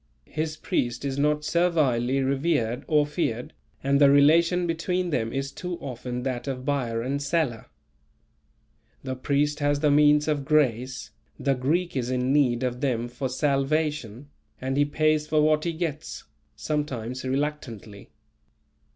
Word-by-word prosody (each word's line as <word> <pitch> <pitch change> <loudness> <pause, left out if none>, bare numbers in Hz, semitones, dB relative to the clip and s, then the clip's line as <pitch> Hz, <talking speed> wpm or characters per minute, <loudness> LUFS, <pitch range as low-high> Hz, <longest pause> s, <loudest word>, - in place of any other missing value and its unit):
His 155 0 -3
priest 120 -2 -2
is 135 0 -2
not 150 +1 +1
servilely 150 -6 +2
revered 135 -3 0
or 150 -2 +3
feared, 125 -6 -3 0.3
and 140 +1 +2
the 140 - +8
relation 165 +5 +4
between 175 +2 -1
them 115 -5 -1
is 135 0 -3
too 180 +3 -5
often 125 -2 -5
that 125 -1 -3
of 130 -1 -4
buyer 120 -5 -1
and 140 +3 -2
seller. 140 -6 -1 1.4
The 130 -1 -3
priest 145 +3 0
has 145 0 +1
the 150 -2 +3
means 150 +1 +5
of 150 -2 0
grace, 130 -5 0 0.3
the 140 - +1
Greek 155 +7 -1
is 125 -2 -1
in 130 +1 0
need 130 -4 +2
of 125 0 -2
them 120 -4 -1
for 125 +2 -4
salvation, 140 -2 -1 0.3
and 130 +1 -2
he 145 +1 +3
pays 155 +1 +1
for 155 0 +2
what 155 +1 +3
he 170 - 0
gets, 160 -2 -4 0.3
sometimes 130 -5 -3
reluctantly. 130 -7 -4
140 Hz, 145 wpm, -26 LUFS, 125-150 Hz, 1.4 s, the